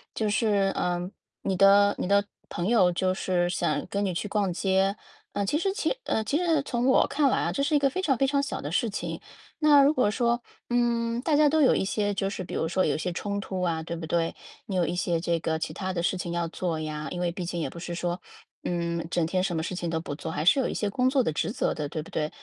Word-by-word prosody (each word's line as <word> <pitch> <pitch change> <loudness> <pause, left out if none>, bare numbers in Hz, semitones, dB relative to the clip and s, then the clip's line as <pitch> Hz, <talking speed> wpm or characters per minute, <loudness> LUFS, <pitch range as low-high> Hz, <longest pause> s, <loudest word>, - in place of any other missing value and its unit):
就 215 -2 0
是， 205 -3 +2
嗯， 180 +1 -1 0.3
你 190 -2 -1
的 200 +1 +6
你 - - -1
的 200 0 +4 0.3
朋 175 +2 -2
友， 200 -7 +4
就 185 +1 +1
是 180 -2 0
想 180 - -1
跟 200 0 -1
你 185 - -1
去 200 +4 -3
逛 200 -4 0
街， 195 +2 +1 0.4
嗯， 205 -1 -1
其 290 - +1
实 385 +4 0
其 455 +4 0
嗯， 220 - 0
其 245 +8 0
实 330 -4 +2
从 245 -1 -1
我 260 - +5
看 280 0 +2
来 - - +1
啊， - - 0
这 280 - -2
是 285 +2 +2
一 290 - +5
个 275 - +3
非 370 +8 -3
常 270 -9 +1
非 270 - +3
常 280 +1 +2
小 280 - -4
的 145 - -5
事 225 +7 +1
情。 205 - -4 0.4
那 295 -3 +6
如 285 - +5
果 255 -7 +2
说， 235 +2 +1 0.3
嗯， 235 -1 +1
大 295 +2 +1
家 300 -1 +5
都 315 - +2
有 265 - +5
一 - - +1
些 205 +1 0
就 195 0 -1
是 200 - -5
比 - - -8
如 160 - -1
说 185 +1 +1
有 - - +1
一 - - -1
些 180 +3 -2
冲 200 +3 -3
突 190 -1 -4
啊， 165 -3 0
对 170 +1 -5
不 165 - -5
对？ 165 +1 0 0.3
你 190 - -2
有 175 -2 +2
一 175 - -2
些 175 -2 0
这 170 0 0
个 160 0 -1
其 - - -3
它 190 -1 -3
的 175 -2 -2
事 185 +2 0
情 175 -1 -4
要 170 -1 -1
做 165 -1 -3
呀， 155 -1 -4
因 175 - -4
为 175 -1 -1
毕 180 - -4
竟 175 0 -3
也 - - -2
不 170 - -10
是 175 0 -5
说， 175 +1 -2 0.5
嗯， 170 -1 -1
整 175 -2 +1
天 185 +3 0
什 180 -2 -1
么 160 - -1
事 185 - -4
情 175 -2 -3
都 165 0 -1
不 145 - -5
做， 160 +2 -6
还 150 - -2
是 180 - +5
有 260 - +1
一 - - -3
些 210 - -1
工 250 +5 +2
作 265 -1 +2
的 160 - 0
职 150 - -1
责 255 - 0
的， 150 -1 -3
对 155 - -4
不 150 - -12
对？ 150 0 -1
195 Hz, 300 characters per minute, -27 LUFS, 170-240 Hz, 0.5 s, 的